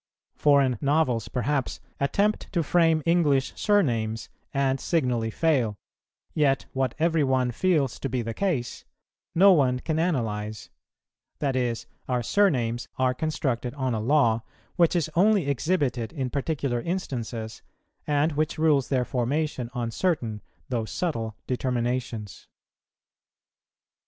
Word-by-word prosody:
Foreign 140 -5 +3
novels, 140 -5 +1
perhaps, 135 +2 -1 0.2
attempt 200 +10 0
to 170 -4 +1
frame 165 -1 +3
English 150 -6 +2
surnames, 115 - +1 0.2
and 135 -1 +1
signally 125 -9 0
fail; 125 -5 +1 0.6
yet 140 -3 +2
what 130 -2 -1
every 160 0 +2
one 130 -2 +1
feels 155 -1 +1
to 135 - -3
be 125 -1 -1
the 115 0 -4
case, 145 - -2 0.5
no 195 +4 +7
one 130 -6 +3
can 155 +4 -2
analyze: 110 - -2 0.7
that 140 -3 -1
is, 120 -3 -1 0.2
our 125 -1 0
surnames 120 - +1
are 130 -1 +2
constructed 130 -4 -2
on 130 -3 -1
a 110 - -1
law 115 -2 +3 0.3
which 175 -1 +3
is 170 -4 +1
only 195 -2 +4
exhibited 140 -5 0
in 130 -6 -3
particular 140 -4 -1
instances, 120 - -4 0.5
and 150 +2 +2
which 155 +1 -1
rules 155 -4 +2
their 130 -3 +1
formation 130 0 -1
on 120 -2 -2
certain, 120 - -1 0.3
though 120 -3 -1
subtle, 115 -4 -3
determinations. 120 -4 -2
135 Hz, 125 wpm, -26 LUFS, 120-155 Hz, 0.7 s, no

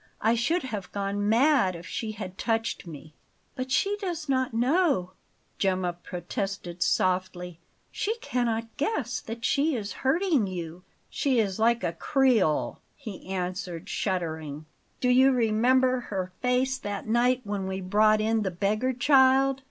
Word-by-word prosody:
I 225 +2 +3
should 320 +10 +1
have 210 -7 -5
gone 200 +1 -1
mad 235 - +3
if 170 0 -9
she 215 +4 -4
had 190 -3 -7
touched 225 -3 -2
me!" 155 -1 -10 0.4
"But 255 0 -5
she 400 +10 +1
does 350 -6 -4
not 260 -2 +1
know," 245 - +1 0.5
Gemma 185 -2 +1
protested 175 +1 -5
softly. 180 -1 0 0.3
"She 430 +2 -1
cannot 230 - -2
guess 435 +10 -1
that 230 +1 -6
she 300 0 +2
is 210 -3 -4
hurting 300 - +2
you." 175 -2 -6 0.3
"She 270 -3 +1
is 205 -3 0
like 235 +1 +3
a 170 - -1
Creole," 235 - +1 0.2
he 220 -12 -9
answered, 180 -2 -4
shuddering. 160 -6 -3 0.3
"Do 250 - +1
you 260 +2 +6
remember 255 +2 +3
her 190 -6 -4
face 260 +1 +1
that 205 -3 -5
night 245 +3 +2
when 200 -2 -3
we 190 0 -3
brought 215 +3 +3
in 220 +1 +1
the 195 - -1
beggar 210 +8 0
child? 265 +1 +4
220 Hz, 145 wpm, -27 LUFS, 185-260 Hz, 0.5 s, you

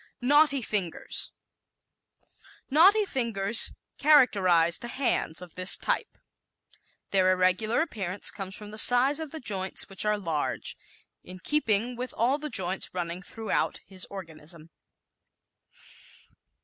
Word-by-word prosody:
Knotty 280 +1 +3
Fingers 195 -7 -2 0.9
¶ - - -35 0.4
Knotty 390 +9 +5
fingers 230 - +1 0.3
characterize 190 - +4
the 240 - -7
hands 240 - -1
of 175 - -13
this 185 +1 +3
type. - - -2 0.9
Their 185 -1 +3
irregular 185 +7 +1
appearance 205 - -1
comes 195 -1 -7
from 210 -1 -11
the 215 - 0
size 255 +6 +5
of 320 -2 -6
the 320 - -8
joints 195 -7 -1
which 195 - -1
are 210 0 0
large, 165 -7 -2 0.5
in 185 - -11
keeping 235 -1 0
with 250 +1 -6
all 255 +6 +1
the 300 0 -5
joints 190 -5 -2
running 175 0 -4
throughout 220 +2 -3
his 190 -1 -3
organism. 165 -3 -9
210 Hz, 125 wpm, -27 LUFS, 185-260 Hz, 0.9 s, Knotty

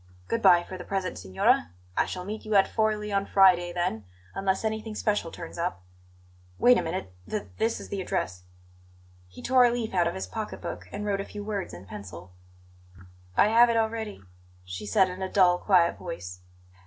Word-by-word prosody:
Good 230 - -1
bye, 175 -4 +6
for 185 +1 -8
the - - -6
present, 190 -2 -3
signora; 95 -2 +1 0.2
I - - +2
shall 180 -1 -5
meet 215 +2 -5
you 215 -1 -2
at 195 - +6
Forli 215 -1 0
on 195 0 0
Friday, 180 -3 +5
then, 175 - -2 0.3
unless 195 +2 -1
anything 220 0 -3
special 210 -5 0
turns 170 0 -9
up. 170 - -2 0.7
Wait 245 0 +6
a - - 0
minute; 160 - -4 0.2
th 210 -1 -2 0.2
this 225 +1 +1
is - - -10
the 195 - -3
address." 90 - -2 0.9
He 90 - -13
tore 255 -1 +5
a - - +5
leaf 235 -3 -3
out 175 -2 +3
of - - -2
his 95 - -3
pocket 95 - -6
book 90 +1 -6
and 210 - -5
wrote 200 -1 0
a - - -6
few 205 -1 -8
words 205 -2 -3
in 85 +2 -10
pencil. 90 -2 -10 1.0
"I 210 - +6
have 235 +2 +6
it 230 - +2
already," 220 - -2 0.4
she 90 +3 -6
said 190 - +4
in 185 +1 -7
a 190 - -3
dull, 180 -2 +4
quiet 180 -4 +3
voice. 90 - -7
190 Hz, 195 wpm, -27 LUFS, 165-215 Hz, 1.0 s, bye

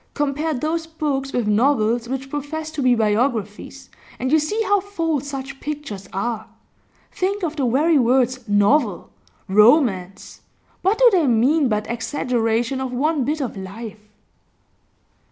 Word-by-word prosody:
Compare 295 +2 -1
those 320 +5 -2
books 285 -4 -3
with 245 -4 -1
novels 230 +1 +2
which 270 +1 -5
profess 305 +2 -4
to 310 -2 -4
be 250 -2 +4
biographies, 225 +3 -1 0.3
and 260 +2 -2
you 315 - +5
see 305 +9 -2
how 405 0 +2
false 330 -8 -2
such 275 -1 -6
pictures 280 -11 -6
are. 220 +3 -3 0.6
Think 390 +2 -2
of 320 -2 -2
the 275 -5 0
very 295 +6 +3
words 255 +1 +2
"novel," 205 - +2 0.4
"romance" 200 - +2 0.4
what 390 +4 +2
do - - +6
they 345 -7 +3
mean 260 +5 +3
but 210 -1 -1
exaggeration 240 0 -1
of 260 -1 -3
one 290 +3 0
bit 300 +2 -1
of 255 - -4
life? 210 +2 -9
265 Hz, 140 wpm, -21 LUFS, 225-305 Hz, 0.6 s, do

